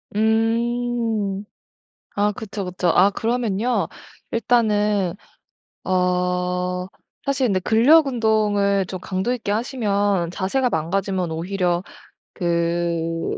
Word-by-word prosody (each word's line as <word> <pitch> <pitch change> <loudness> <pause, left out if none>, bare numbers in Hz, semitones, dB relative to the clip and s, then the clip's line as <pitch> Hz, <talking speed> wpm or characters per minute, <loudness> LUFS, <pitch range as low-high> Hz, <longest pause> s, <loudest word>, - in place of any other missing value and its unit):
음. 225 -2 0 0.7
아 205 +1 +2
그쵸, 205 -1 -6
그쵸. 180 0 -2
아 185 +4 +5
그러면요 225 -3 0 0.4
일단은 210 -5 +1 0.7
어 180 0 0 0.4
사실 270 -2 +1
근데 195 -4 +1
근력 250 - +5
운동을 210 -5 +2
좀 185 0 -6
강도 190 +7 -2
있게 230 -5 -3
하시면 205 -6 0
자세가 225 +8 0
망가지면 185 +1 -1
오히려 175 +1 -1 0.5
그 170 -1 -1
200 Hz, 195 characters per minute, -22 LUFS, 180-225 Hz, 0.7 s, 아